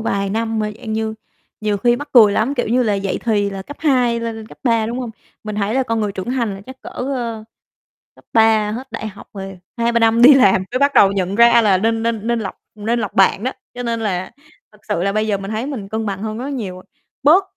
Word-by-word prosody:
vài 200 -3 -1
năm 225 +1 -1
mà 210 0 -1
dạng 225 -4 -6
như 220 0 -2 0.5
nhiều 210 -1 0
khi 240 +4 +2
mắc 290 +2 -7
cười 215 -5 +7
lắm, 240 +8 0
kiểu 245 -5 -1
như 250 +3 +2
là, 210 -3 +1
dậy 195 -1 -2
thì 205 -3 +1
là 195 -1 -6
cấp 290 +7 -10
2 250 -6 +2
lên 225 -1 -5
cấp - - -15
3, 230 -4 +2
đúng 235 +2 -4
hông? 240 -3 -5 0.3
Mình 215 - -4
thấy 210 +3 -1
là 265 - +2
con 230 -3 -1
người 210 -1 -1
trưởng 195 +5 -5
thành 235 -6 -1
là 195 - -9
chắc 260 0 -11
cỡ, - - -9
ơ, 240 -4 -4 0.7
cấp - - -22
3 220 -2 +4
hết 255 +4 -7
đại 220 - -5
học 205 -1 -11
rồi 195 -1 -8 0.2
2-3 235 0 +1
năm 225 +1 +3
đi 275 +4 +10
làm 195 -8 +4
mới 255 - -1
bắt 280 +1 +3
đầu 195 -1 +6
nhận 195 0 -1
ra 235 0 +6
là 200 -4 +4
nên 225 +3 0
nên 230 -1 -2
nên 235 -1 +1
lọc 195 -3 -5 0.2
nên 225 +3 -1
lọc 210 -4 -3
bạn 195 +1 +3
đó. 255 - 0 0.2
Cho 245 0 -6
nên 230 -1 -2
là 190 -3 -2 0.4
thật 210 - -20
sự 170 - -1
là 200 0 0
bây 215 +1 0
giờ 205 - +1
mình 195 +1 -6
thấy 220 +3 -2
mình 235 -9 -6
cân 220 0 -3
bằng 200 0 -4
hơn 215 0 -4
rất 245 - -5
là 275 - -4
nhiều 220 -9 -4
rồi, 185 - -12 0.4
bớt 325 +7 +6
220 Hz, 265 wpm, -19 LUFS, 205-240 Hz, 0.7 s, đi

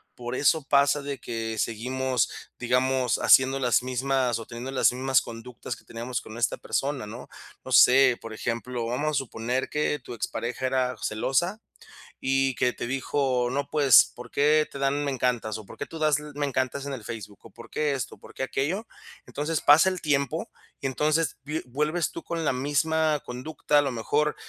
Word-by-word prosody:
por 120 0 -6
eso 155 +3 +2
pasa 140 0 +3
de 140 -2 -4
que 115 -2 -4
seguimos, 130 +2 0 0.3
digamos, 125 +1 +1
haciendo 135 +1 +5
las 125 -1 +2
mismas 130 -1 0
o 115 - -9
teniendo 120 +3 -6
las 130 - +4
mismas 130 +1 +2
conductas 120 +1 -7
que - - -20
teníamos 120 +2 -4
con 110 +2 -9
esta 120 - +1
persona, 140 -4 -2
¿no? 120 +4 -9 0.3
No 130 - -8
sé, 130 0 +7
por 115 -1 -8
ejemplo, 115 +2 -3
vamos 145 +6 -1
a - - -6
suponer 125 -2 -2
que 150 -1 0
tu 125 - -9
expareja 120 +3 -3
era 130 -1 0
celosa. 175 - 0 0.6
Y 135 -1 +1
que 125 - +2
te - - -5
dijo: 130 -1 0
"No, 140 +2 -2
pues, 145 -5 +6
¿por 125 0 -9
qué 150 +2 +3
te 140 - -8
dan 140 +1 +1
me 140 - -1
encantas 120 -4 -1
o 110 - -10
por - - -13
qué 140 - -4
tú 165 - -9
das 155 -2 +3
l 150 0 -9
me 145 0 -2
encantas 130 +1 -2
en 140 - -4
el 125 -5 -7
Facebook 105 -2 -7
o - - -12
por - - -13
qué 150 -1 0
esto 135 -3 -4
o - - -28
por - - -15
qué - - -5
aquello?". 155 +11 -2 0.4
Entonces 150 +2 -2
pasa 150 +5 +6
el 185 -2 -4
tiempo 140 -4 0 0.3
y 135 - -1
entonces 150 +3 0
vi 150 +2 -3
vuelves 150 +6 -1
tú 170 - -8
con 165 -1 -3
la - - +2
misma 150 +3 +1
conducta, 145 +4 -1
a 145 - +5
lo 135 - -1
mejor 150 +6 0
130 Hz, 195 wpm, -26 LUFS, 125-145 Hz, 0.6 s, sé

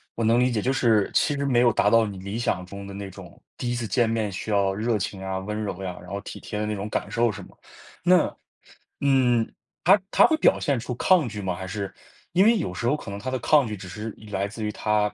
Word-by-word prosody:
我 115 - -2
能 115 +2 +4
理 125 +1 +3
解， 115 -4 -1
就 130 - +1
是 115 -6 +3
其 145 - +2
实 140 0 -2
没 125 -3 +3
有 120 -2 +4
达 105 - +3
到 115 +1 +5
你 100 -2 -6
理 100 +4 -5
想 95 -6 -1
中 100 +1 -9
的 100 - -8
那 100 -1 -6
种， 95 -2 -13 0.2
第 125 - -3
一 - - -1
次 120 -1 -3
见 115 +3 +2
面 110 -3 -1
需 95 - -6
要 100 -2 +2
热 110 +3 0
情 95 0 -4
啊、 95 0 -3
温 105 +3 -4
柔 100 -2 -4
呀， 90 -1 -5
然 - - -12
后 100 0 -4
体 - - -8
贴 105 - -6
的 105 - -1
那 105 - -2
种 100 +1 -4
感 100 - -3
受 115 0 +2
是 105 - -8
么？ - - -14 0.5
那， 180 0 +4 0.7
嗯， 125 -5 +3 0.3
他 195 +4 +6
他 - - +6
会 320 - +2
表 - - +4
现 140 -3 +1
出 120 +1 -4
抗 170 +2 +3
拒 105 -1 -6
吗？ 95 -2 -2
还 95 +1 -6
是， 100 +1 -5 0.4
因 185 +3 +5
为 230 +2 +5
有 90 - -3
时 90 - -4
候 125 +5 +2
可 100 - -9
能 100 - -5
他 130 +6 -4
的 130 - -1
抗 145 +2 +4
拒 105 -1 -5
只 95 -1 -9
是 110 +4 -6 0.2
来 100 -1 -1
自 110 +2 -9
于 105 - -1
他 105 0 +1
105 Hz, 290 characters per minute, -25 LUFS, 100-120 Hz, 0.7 s, 他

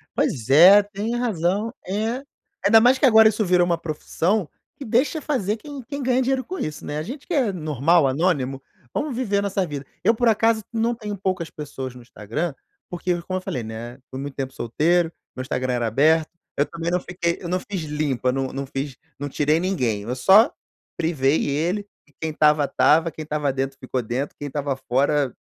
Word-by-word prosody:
Pois 120 -1 -1
é, 180 +8 +9
tem 205 +3 -4
razão, 210 -1 0
é. 220 +7 -2 0.4
Ainda 220 +2 +7
mais 250 +2 +5
que 275 - +3
agora 220 -3 +7
isso 215 -1 -1
virou 180 -1 +4
uma 170 -1 +1
profissão, 170 +4 -1 0.3
que 280 - -9
deixa 265 +8 +1
fazer 225 -8 -1
quem 285 +2 -9
quem 280 +4 -6
ganhe 255 0 +2
dinheiro 260 0 0
com 370 - -6
isso, 155 0 -5
né. 145 - -4
A 155 - -2
gente 265 - -8
que 355 - -3
é 255 -9 +2
normal, 155 -2 +2
anônimo, 135 -3 0 0.3
vamos 290 -5 -2
viver 210 -6 0
a - - +2
nossa 195 -1 0
vida. 145 -3 -6 0.2
Eu 225 - +4
por 240 +1 +1
acaso 225 0 +3
não 230 +1 +1
tenho 210 -3 -5
poucas 185 -3 -2
pessoas 135 -4 -7
no 125 - -11
Instagram, 120 - -4 0.4
porque 175 0 -2
como 185 +1 -3
eu - - -4
falei, 125 -9 -4
né, 115 +3 -7
foi 130 - -7
muito 140 0 -6
tempo 135 -1 -4
solteiro, 165 +8 +1 0.2
meu 130 - -4
Instagram 130 -1 -2
era 120 -2 0
aberto, 155 +7 +3 0.3
eu 145 - +3
também 170 0 -4
não 180 - +2
fiquei 170 -1 -2
eu 175 - -7
não 185 +1 0
fiz 190 -2 -5
limpa, 145 -4 -1
não 135 0 -1
não 135 +1 -5
fiz, 135 0 -5 0.2
não 145 0 -4
tirei 150 +3 +1
ninguém, 125 - -1
eu 125 +3 -3
só 195 - +6 0.4
privei 155 -3 +1
ele, 175 +8 -1 0.2
e - - -26
quem 160 -1 -2
estava 150 -1 +4
estava, 160 +4 +3
quem 155 - -9
estava 150 -2 -1
dentro 135 0 -3
ficou 130 -1 -2
dentro, 125 +5 -3
quem 145 - -4
estava 140 -1 -2
fora, 135 +1 +1
165 Hz, 205 wpm, -23 LUFS, 135-210 Hz, 0.4 s, é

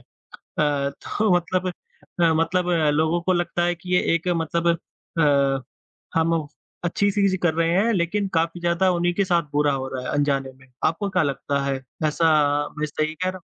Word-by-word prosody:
अ, - - -25 0.6
तो 145 +7 0
मतलब 185 +2 0 0.5
अ, 165 -1 +5
मतलब 175 +3 +1 0.3
लोगों 160 +2 +1
को 185 +2 +1
लगता 175 0 0
है 175 0 +1
कि 180 +1 -6
ये - - +4
एक 170 +2 -3
मतलब 170 -1 0 0.5
अ, 140 -3 +3 0.6
हम 165 -2 +1 0.4
अच्छी 200 +4 +1
चीज़ 195 -1 +2
कर 170 -3 +2
रहे 165 0 +1
हैं 210 +6 +3
लेकिन 195 +2 0
काफ़ी 165 +1 0
ज़्यादा 175 +2 +2
उन्हीं 175 0 +1
के 200 +2 +2
साथ 175 -2 +2
बुरा 145 0 +2
हो 130 -1 -3
रहा 130 -1 -5
है - - -3
अनजाने 140 -2 0
में। 130 0 -21 0.2
आपको 195 +5 0
क्या 185 -2 +2
लगता 140 0 -1
है 140 -1 0 0.3
ऐसा 165 +2 +1 0.5
मैं 155 - 0
सही 155 +1 -2
कह 185 +3 -2
रहा 185 - -4
हूँ? - - -24
170 Hz, 185 wpm, -23 LUFS, 150-180 Hz, 0.6 s, अ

